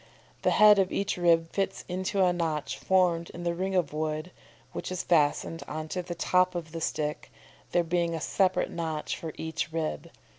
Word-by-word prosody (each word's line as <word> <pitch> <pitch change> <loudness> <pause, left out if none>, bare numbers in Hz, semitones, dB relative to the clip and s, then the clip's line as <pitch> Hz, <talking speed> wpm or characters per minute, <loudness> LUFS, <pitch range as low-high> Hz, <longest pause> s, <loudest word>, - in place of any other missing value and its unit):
The - - +3
head 210 -1 +7
of 190 -1 +2
each 200 - -1
rib 165 -2 +3
fits 195 -1 -2
into 185 +1 +1
a 180 - +3
notch 160 -4 -2
formed 175 -3 +2
in 175 - -6
the 170 0 0
ring 190 +2 -2
of 170 -6 +1
wood, 155 +2 -2 0.4
which - - -5
is 185 - -2
fastened 165 0 +2
on 155 +1 -5
to 180 - -2
the 175 0 -6
top 180 +1 +2
of 165 -2 -5
the 165 0 -5
stick, 150 -1 -2 0.4
there 175 - +3
being 170 0 0
a - - -3
separate, 185 +3 +1
notch 160 -2 -3
for 160 - -6
each 160 0 -3
rib. 160 -1 -3
170 Hz, 190 wpm, -28 LUFS, 160-185 Hz, 0.4 s, head